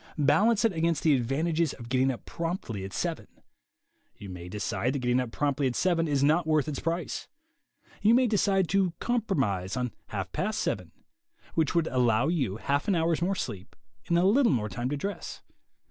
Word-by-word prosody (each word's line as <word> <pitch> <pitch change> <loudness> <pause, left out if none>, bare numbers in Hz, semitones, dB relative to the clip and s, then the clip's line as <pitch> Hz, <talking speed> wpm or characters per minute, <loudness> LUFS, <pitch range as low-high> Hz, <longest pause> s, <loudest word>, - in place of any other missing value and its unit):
Balance 200 - +3
it 225 - +2
against 165 -1 0
the 155 - +5
advantages 155 +6 0
of 120 -3 -10
getting 130 +2 +2
up 125 - -4
promptly 165 - -4
at 95 - -6
seven. - - -3 0.9
You 100 - -9
may 90 -1 -8
decide 105 +5 -2
that - - -1
getting 125 0 +2
up 125 -2 -3
promptly 140 0 0
at 125 - -2
seven 170 -3 +1
is 140 -2 +1
not 160 +3 +3
worth 155 -2 +2
its 145 -3 -3
price. 170 +2 -3 0.7
You 220 +3 +5
may 255 +1 +4
decide 200 -4 +2
to 190 -1 +2
compromise 135 - -1
on 125 -2 -1 0.2
half 95 -3 -4
past 210 +3 -2
seven, - - -2 0.6
which 160 0 +1
would 170 -2 +3
allow 125 0 +2
you 130 - -1
half 140 +5 -1
an 200 - +3
hour's 165 0 +1
more 190 +3 +1
sleep 105 - -6 0.3
and 170 - +2
a 175 - +3
little 235 +7 +4
more 110 -5 0
time 120 +7 -3
to 145 - -2
dress. 200 +7 -5
150 Hz, 190 wpm, -28 LUFS, 125-175 Hz, 0.9 s, the